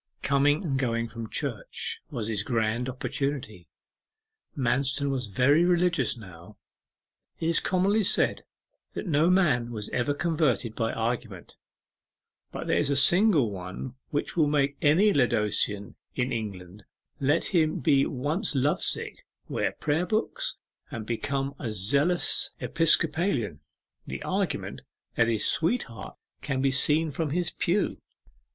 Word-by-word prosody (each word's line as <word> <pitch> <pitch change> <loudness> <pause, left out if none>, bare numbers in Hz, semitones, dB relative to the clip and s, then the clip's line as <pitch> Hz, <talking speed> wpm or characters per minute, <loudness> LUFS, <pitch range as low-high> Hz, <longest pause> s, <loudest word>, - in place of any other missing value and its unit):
Coming 145 +4 +2
and 135 -6 -1
going 115 -3 -1
from 115 -2 -7
church - - -4
was 115 - -4
his 110 -2 -1
grand 115 +2 -1
opportunity. 125 - -4 0.9
Manston 135 +2 +1
was 130 -4 -2
very 135 - +3
religious 175 -5 +2
now. 95 -1 -13 0.8
It 165 - -1
is 170 - +3
commonly 195 +4 +1
said - - +2 0.5
that - - -4
no 160 -1 +3
man 150 -11 +3
was 110 -3 -5
ever 135 +4 -1
converted 145 - 0
by 115 -1 -1
argument, 115 -4 -4 1.0
but - - -6
there - - +1
is 145 - 0
a 140 - +1
single 160 - +5
one 95 +6 -7 0.2
which 145 - -3
will 160 -3 +3
make 140 -1 +1
any 175 +7 +4
Laodicean 105 -5 +1 0.2
in 125 0 -1
England, 100 -4 -6 0.4
let 145 +4 +2
him 155 -3 +2
be 135 +1 +3
once 150 - -2
love 140 +3 +1
sick, - - -1 0.2
wear - - -1
prayer 160 +4 -1
books 465 - -2 0.3
and 115 -2 -6
become 135 +4 -2
a 115 - -3
zealous 140 - +2
Episcopalian 160 - +2 0.5
the - - -5
argument - - -2 0.3
that 115 - +2
his 110 -2 0
sweetheart 165 - -1 0.2
can 135 -3 -2
be 135 0 +2
seen 150 +4 +2
from 155 +2 -2
his 175 +3 -1
pew. - - -1
135 Hz, 135 wpm, -27 LUFS, 115-160 Hz, 1.0 s, single